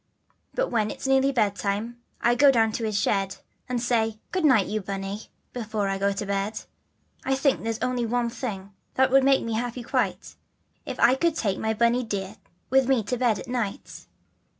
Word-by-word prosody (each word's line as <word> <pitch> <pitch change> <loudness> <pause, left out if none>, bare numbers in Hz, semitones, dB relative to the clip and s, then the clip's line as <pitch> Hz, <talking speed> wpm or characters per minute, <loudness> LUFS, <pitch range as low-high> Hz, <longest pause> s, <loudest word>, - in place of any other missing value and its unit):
Then - - 0
when 215 -3 +1
it's - - -7
nearly 270 +1 +3
bedtime 215 0 -1 0.2
I 240 - +4
go 280 +4 +6
down 225 -4 +3
to 225 +1 -3
his 210 -2 0
shed, 195 -1 0 0.3
And 250 -1 0
say 225 -2 0
'Good 370 -2 -1
night 255 -10 +5
you 215 0 -2
Bunny' 195 +2 -5 0.3
before 215 -4 -2
I 195 0 -2
go 200 +1 +2
to 200 +1 -3
bed. 200 +2 -2 0.6
I 270 - +1
think 275 0 +1
there's 225 -1 -2
only 245 -2 0
one 240 0 0
thing 200 -6 -6 0.2
that 265 0 +3
would 270 0 +6
make 270 0 +4
me 230 - -3
happy 240 +2 -3
quite, - - -2 0.5
If - - -5
I 250 - +6
could 330 +4 +1
take 200 -8 -1
my 220 0 -1
Bunny 235 +3 +2
dear 200 -2 -4 0.3
with 265 -1 +4
me 255 -5 +3
to 250 +5 -2
bed 235 -4 +2
at - - -8
night? 240 -5 -4
230 Hz, 195 wpm, -25 LUFS, 205-255 Hz, 0.6 s, go